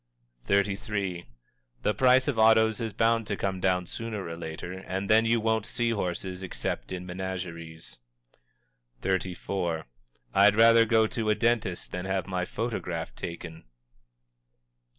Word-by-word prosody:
_" - - -18
XXXIII. 100 -2 0 0.6
"The 105 - +2
price 130 +4 +4
of 135 -6 0
autos 110 +1 +5
is 110 -1 -2
bound 115 0 +2
to 105 - -2
come 95 -1 -2
down 90 -1 +1
sooner 110 +1 -5
or 85 - -5
later, 80 +1 -6
and 95 +1 -4
then 110 +2 +5
you 115 +1 +3
won't 110 -1 0
see 120 -1 0
horses 95 -2 -3
except 95 - -4
in 90 -1 -5
menageries." 85 -7 -6 1.0
XXXIV. 90 -2 -1 0.5
"_I'd 100 +1 +6
rather 115 0 +7
go 110 0 +4
to 110 -1 -2
a 105 - +4
dentist 115 -7 0
than 90 +1 -4
have 95 -2 -1
my 90 -1 -2
photograph 90 -7 -4
taken. 85 -2 -7
95 Hz, 140 wpm, -28 LUFS, 90-110 Hz, 1.0 s, rather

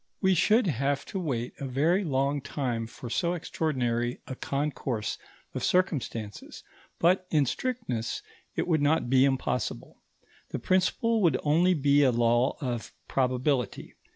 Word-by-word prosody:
We 190 -2 +3
should 215 +7 +4
have 140 - 0
to 195 - -1
wait 125 -9 -2
a 140 - -4
very 160 +10 +2
long 140 -2 0
time 125 -5 -3
for 120 - -9
so 170 +9 0
extraordinary 125 -8 -1
a - - -6
concourse 135 -5 -2 0.3
of - - -4
circumstances, 130 - -1 0.3
but, 180 +2 +3
in 150 -3 +3
strictness, 130 - -3 0.3
it - - -1
would 160 -4 +2
not 145 -4 +2
be 130 0 +6
impossible. 130 -3 -2 0.5
The - - -3
principle 220 +5 +1
would 170 -5 +4
only 170 +5 +3
be 145 -1 +4
a 135 -3 +5
law 120 +2 +2
of 120 -5 -4
probability. 130 -1 0
140 Hz, 140 wpm, -28 LUFS, 125-170 Hz, 0.5 s, be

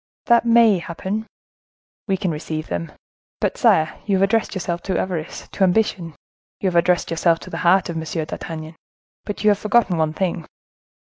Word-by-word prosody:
"That 235 0 +4
may 230 -4 +5
happen." 190 +6 -4 0.8
"We 195 -2 +1
can 185 -2 -1
receive 155 0 -5
them! 85 -1 -3 0.5
But, - - 0
sire, 155 0 +2
you 200 - +2
have 190 - +2
addressed 215 +2 +1
yourself 175 -2 -3
to 185 - +1
avarice, 175 -4 -4
to 195 - -1
ambition; 180 -4 +1 0.4
you 190 - +1
have 175 - -6
addressed 175 +1 +2
yourself 165 0 +2
to 185 - -10
the - - -4
heart 185 +2 +4
of 170 -2 -4
M. 160 - -3 0.2
d'Artagnan, 160 0 -7 0.5
but 205 -1 -5
you 210 - +6
have 205 - 0
forgotten 210 -4 +2
one 155 -1 +1
thing." 170 -2 -2
180 Hz, 180 wpm, -21 LUFS, 165-200 Hz, 0.8 s, you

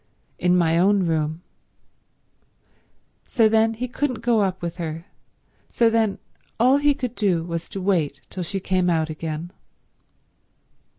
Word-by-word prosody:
"In 180 0 +3
my 165 -1 +3
own 195 +1 +3
room." 160 0 -1 1.8
So 230 -4 +3
then 225 +1 +3
he 250 +3 -3
couldn't 250 -2 -2
go 235 -2 +3
up 190 -2 0
with 170 0 -4
her; 165 -1 -5 0.6
so 230 -1 +2
then 225 -3 +1 0.4
all 255 +4 +5
he 290 0 +3
could 250 -4 -4
do 190 -8 +1
was 170 0 -5
to 195 - -5
wait 170 -8 0
till 185 - -5
she 195 +3 -3
came 185 -1 0
out 160 -2 0
again. 160 +2 -5
185 Hz, 140 wpm, -23 LUFS, 165-225 Hz, 1.8 s, all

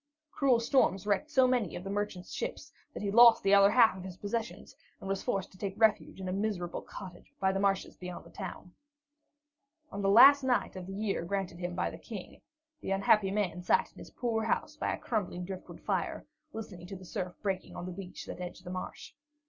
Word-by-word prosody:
Cruel 260 -4 +3
storms 230 -5 +2
wrecked 210 +9 0
so 265 -4 +5
many 245 -8 0
of 175 - -6
the 195 - -6
merchant's 205 -3 -3
ships - - -5 0.2
that - - -7
he 200 - -1
lost 235 +1 +8
the 195 - +4
other 200 0 +7
half 225 -1 +5
of 185 - -8
his 185 -1 -8
possessions, 220 +3 -4 0.2
and - - -8
was 195 0 -1
forced 195 -6 -2
to 185 - -18
take 200 +1 -4
refuge 220 -3 +2
in 190 - -5
a 185 - -2
miserable 195 -4 -2
cottage 185 -3 -11
by 190 0 +2
the 195 - -1
marshes 195 -1 0
beyond 180 -1 -8
the - - -15
town. 185 -2 -8 1.2
On 200 - -4
the 195 - +2
last 275 +7 +9
night 250 -8 0
of 185 -1 -7
the 195 - -6
year 205 -4 -1
granted 190 -1 -3
to - - -11
him 175 0 -4
by - - -1
the - - -10
King, 205 -5 -9 0.4
the - - -5
unhappy 195 +1 +3
man 190 -3 -1
sat 180 - +2
in - - -16
his - - -10
poor 225 -3 -1
house - - -1
by - - -1
a - - -2
crumbling 180 -5 -3
driftwood 190 0 -8
fire, - - -2 0.3
listening 190 -7 -8
to 195 - -7
the 185 0 -11
surf 180 0 -4
breaking 190 -2 -3
on 175 - -6
the 185 - -5
beach 185 0 -8
that - - -7
edged 180 0 -7
the 180 - -7
marsh. 185 0 -6
195 Hz, 220 wpm, -31 LUFS, 185-220 Hz, 1.2 s, last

